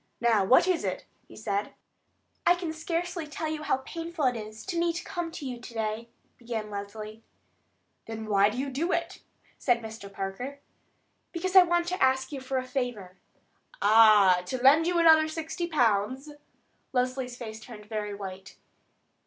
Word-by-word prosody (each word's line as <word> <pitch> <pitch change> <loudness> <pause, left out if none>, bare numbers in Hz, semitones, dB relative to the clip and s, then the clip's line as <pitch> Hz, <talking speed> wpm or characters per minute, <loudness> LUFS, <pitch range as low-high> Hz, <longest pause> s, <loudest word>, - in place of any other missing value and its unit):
"Now, 230 -4 +3
what 255 - +5
is 365 -3 +1
it?" - - -3 0.2
he - - -14
said. 200 +1 -3 0.7
"I 350 - +5
can 350 -3 -4
scarcely 335 +1 -3
tell 305 +2 -4
you 310 0 -3
how 270 -3 0
painful 330 -2 -4
it 250 -1 +2
is 215 -1 -8
to 350 -3 -2
me 340 0 +2
to 345 - -5
come 345 -3 -4
to 305 - -7
you 250 -2 -5
to 240 -1 -11
day," 220 +1 -3 0.3
began 225 -3 -5
Leslie. 210 +2 -7 0.9
"Then 220 -1 -6
why 200 -1 +4
do 220 - -6
you 275 +1 -2
do 325 +7 -1
it?" - - -2 0.4
said 245 -3 +2
Mr. 220 -3 -8
Parker. 200 +9 -5 0.7
"Because 370 +2 -3
I 375 - +12
want 345 -1 +1
to 365 - -3
ask 265 +1 +2
you 275 -2 -5
for 265 0 -2
a 255 - -2
favor." 245 -9 -4 0.6
"Ah, 210 -4 +6
to 255 - -2
lend 305 +5 +6
you 350 0 +1
another 320 -2 +6
sixty 320 +2 -4
pounds?" 255 -1 +1 0.6
Leslie's 255 -1 -1
face 220 -3 -7
turned 220 -2 -11
very 210 -1 -4
white. 190 -1 -9
255 Hz, 170 wpm, -28 LUFS, 215-320 Hz, 0.9 s, I